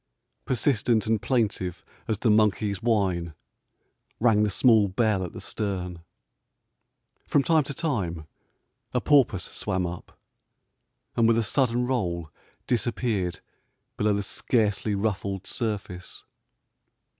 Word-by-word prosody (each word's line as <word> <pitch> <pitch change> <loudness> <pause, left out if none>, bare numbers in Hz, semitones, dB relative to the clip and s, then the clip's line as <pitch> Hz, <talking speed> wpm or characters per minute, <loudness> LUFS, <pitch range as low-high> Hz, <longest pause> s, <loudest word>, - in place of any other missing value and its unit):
Persistent 115 -3 +1
and 110 -1 +1
plaintive 105 -8 -1 0.2
as 110 - 0
the 110 +1 +2
monkey's 105 -2 +2
whine 95 -8 0 0.8
rang 110 -2 +4
the 105 - +2
small 110 0 +4
bell 100 0 +1
at 90 - -5
the - - -9
stern. 90 -5 -3 1.2
From 140 - +3
time 160 0 +3
to 140 - -4
time 95 - -2 0.7
a - - +4
porpoise 125 -9 +3
swam 95 -3 -2
up, 85 0 -8 1.0
and 115 -1 +4
with 115 0 +4
a 115 - +2
sudden 125 +2 +1
roll 85 -11 -2 0.3
disappeared 115 -7 -1 0.5
below 105 0 +1
the 100 0 -1
scarcely 105 -1 0
ruffled 100 -2 -2
surface. 100 -6 -4
105 Hz, 115 wpm, -26 LUFS, 95-120 Hz, 1.2 s, rang